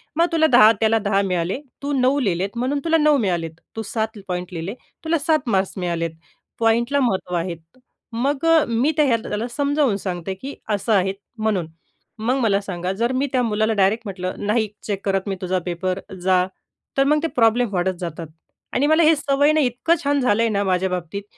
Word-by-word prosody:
मग 335 +2 +4
तुला 315 -1 +4
10 220 -3 +8
त्याला 225 0 +3
10 200 -1 +1
मिळाले, 180 +2 -1 0.2
तू 285 - -2
9 260 +3 +3
लिहिलेत 195 -2 -1
म्हणून 260 +4 0
तुला 325 0 +3
9 300 -2 +4
मिळालेत, 175 -7 -1 0.2
तू 225 - -3
7 220 +1 -3
पॉइंट 180 -1 -3
लिहिले 170 +5 -4 0.3
तुला 325 +1 +1
7 300 -4 +1
मार्क्स 190 -1 +1
मिळालेत. 170 -2 -2 0.5
पॉइंटला 235 +5 +2
महत्त्व 190 -7 0
आहे." 170 0 -2 0.6
मग 275 +6 -1
अ, 330 -1 +5
मी 235 +6 +1
त्या 300 - +4
ह्यातलं 230 -4 0
त्याला 215 +3 -2
समजावून 285 -6 +1
सांगते, 185 -1 -4
की 265 +9 -8
असं 210 +1 0
आहे 190 -1 +2 0.2
म्हणून. 210 -6 0 0.5
मग 245 +5 0
मला 210 -5 +2
सांगा, 180 -2 -4
जर 235 +5 0
मी 265 +2 0
त्या 255 -2 +2
मुलाला 220 0 +1
डायरेक्ट 200 +3 +2
म्हटलं, 185 -2 -4
"नाही 215 +1 +1 0.2
चेक 200 -2 -3
करत 195 0 0
मी 195 - -1
तुझा 185 0 0
पेपर, 185 +1 -2 0.2
जा." 185 0 +3 0.5
तर 275 - +5
मग 300 +1 +3
ते - - +2
प्रॉब्लेम 235 0 +3
वाढत 185 +1 +1
जातात 170 -2 -5 0.5
आणि 285 +3 +2
मला 315 +2 +4
हे 320 +1 +6
सवय 285 0 +2
ना 310 - +2
इतकं 265 +5 +2
छान 285 0 +2
झालं 230 -3 +2
आहे 230 - +2
ना 200 -1 0
माझ्या 190 -1 +1
बाबतीत 180 +2 -4
220 Hz, 195 wpm, -21 LUFS, 190-265 Hz, 0.6 s, 10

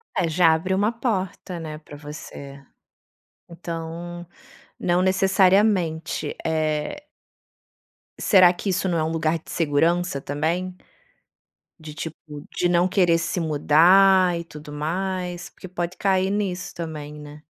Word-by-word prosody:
Eh, 180 -3 +1
já 165 0 +4
abre 185 +4 -1
uma 205 +4 +2
porta, 195 -6 -3
né, 155 -1 -6
pra 145 -2 -12
você. 140 -2 -10 0.9
Então, 170 0 -7 0.5
não 175 0 +1
necessariamente, 190 -2 +2
eh 155 - -1 1.1
Será 185 -4 +6
que 195 +3 -4
isso 190 0 0
não 170 - 0
é 155 - +1
lugar 160 0 0
de 160 - -13
segurança 165 0 +1
também? 165 +7 -2 1.0
De 155 -1 -9
tipo 160 +1 -6 0.4
de 175 - +1
não 175 +1 +3
querer 180 -3 +3
se 170 +2 -2
mudar 175 +4 +5
e - - -5
tudo 150 -2 -11
mais? 180 +3 -3
Porque 185 - -12
pode 175 0 -4
cair 190 -1 +1
nisso 195 -3 -2
também, 155 -3 -6
né? 150 +1 -11
170 Hz, 125 wpm, -23 LUFS, 155-185 Hz, 1.1 s, Será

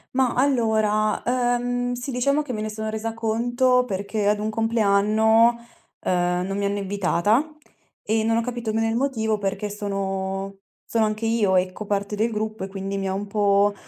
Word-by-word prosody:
Mah, 260 -2 +2
allora, 220 -5 +2
ehm, 245 0 0
sì, 245 +3 -5
diciamo 280 +4 +1
che 270 -4 -5
me 215 - -3
ne 215 - -3
sono 220 0 -4
resa 220 +1 -3
conto 240 +3 +2
perché 200 0 -2
ad 210 0 +2
un 215 +1 -1
compleanno, 220 0 +3 0.5
uhm, 180 0 0
non 195 0 -3
mi 200 - -2
hanno 200 +1 -1
invitata, 205 - +1 0.5
e 220 +1 +1
non 225 +1 +2
ho - - +2
capito 240 -2 -3
bene 225 +1 +1
il 225 - -1
motivo 225 -5 0
perché 205 +1 -3
sono 195 -1 -3 0.3
sono 225 -1 +2
anche 215 +1 -1
io 215 -5 +2
ecco 185 +3 -1
parte 200 +1 -2
del 225 +2 0
gruppo 215 -1 -3
e - - -3
quindi 195 0 -4
mi 195 -1 -2
ha - - -1
un 200 +1 -4
po' 205 0 +3
215 Hz, 180 wpm, -23 LUFS, 200-230 Hz, 0.5 s, compleanno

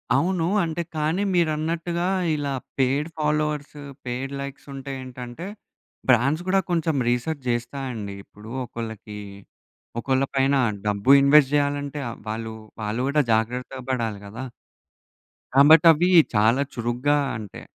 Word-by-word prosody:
అవును. 170 +4 +1 0.2
అంటే 165 0 -2
కానీ 155 +5 0
మీరన్నట్టుగా 170 +1 0 0.3
ఇలా 145 -2 -2 0.3
పెయిడ్ 135 +3 +2
ఫాలోవర్స్, 150 -1 -1 0.3
పెయిడ్ 130 +3 -4
లైక్స్ 140 +1 -8
ఉంటే 135 0 -6
ఏంటంటే 125 +4 -8 0.6
బ్రాండ్స్ 140 +7 +3
గూడా 195 +1 +3
కొంచెం 165 -2 +1
రిసర్చ్ 130 +4 -1
చేస్తాయండి. 120 -3 -3
ఇప్పుడు 105 +3 -13
ఒకళ్ళకి 110 -3 -7 0.8
ఒకళ్ళ 130 +2 +1
పైన 135 +1 +3 0.3
డబ్బు 105 +4 +2
ఇన్వెస్ట్ 140 0 +6
చేయాలంటే 145 0 0 0.3
వాళ్ళు 110 +1 -4 0.3
వాళ్ళు 105 +3 -2
కూడా 150 +1 +3
జాగ్రత్తగా 125 +4 -1
పడాలి 115 -5 -2
గదా! 115 +6 -7 1.1
కాబట్టి 150 +4 +7
అవి 170 +3 +2 0.3
చాలా 110 +6 +4
చురుగ్గా 120 +5 0 0.2
అంటే, 105 -3 -9
135 Hz, 115 wpm, -24 LUFS, 120-150 Hz, 1.1 s, కాబట్టి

